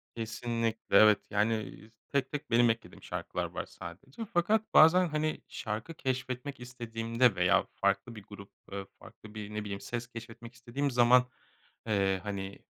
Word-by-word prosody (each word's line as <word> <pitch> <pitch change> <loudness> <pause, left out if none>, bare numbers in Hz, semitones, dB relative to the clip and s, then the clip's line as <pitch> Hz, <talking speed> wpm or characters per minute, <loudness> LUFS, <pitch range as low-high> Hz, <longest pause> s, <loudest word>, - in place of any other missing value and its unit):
Kesinlikle, 115 0 -2
evet. 105 -1 +7
Yani, 110 +1 0
z 110 - -41
tek 140 -2 0
tek 145 -4 -5
benim 120 0 +5
eklediğim 115 0 -3
şarkılar - - -3
var - - -5
sadece. 130 - -9
Fakat 210 +6 +2
bazen, 175 +3 +7
hani, 155 0 -1
şarkı 110 +10 -5
keşfetmek 130 0 -3
istediğimde 115 -2 0
veya 90 0 +3
farklı 120 -2 0
bir 105 - -10
grup, 100 0 -12 0.2
ııı, 100 0 -4
farklı 105 -1 -14
bir, 105 0 -6
ne 105 0 -3
bileyim, 100 -1 -5
ses 120 0 -4
keşfetmek 115 0 -10
istediğim 125 +4 -3
zaman, 125 +1 +6 0.6
eee, 95 -2 +2
hani 100 -1 -5
115 Hz, 150 wpm, -31 LUFS, 105-130 Hz, 0.6 s, evet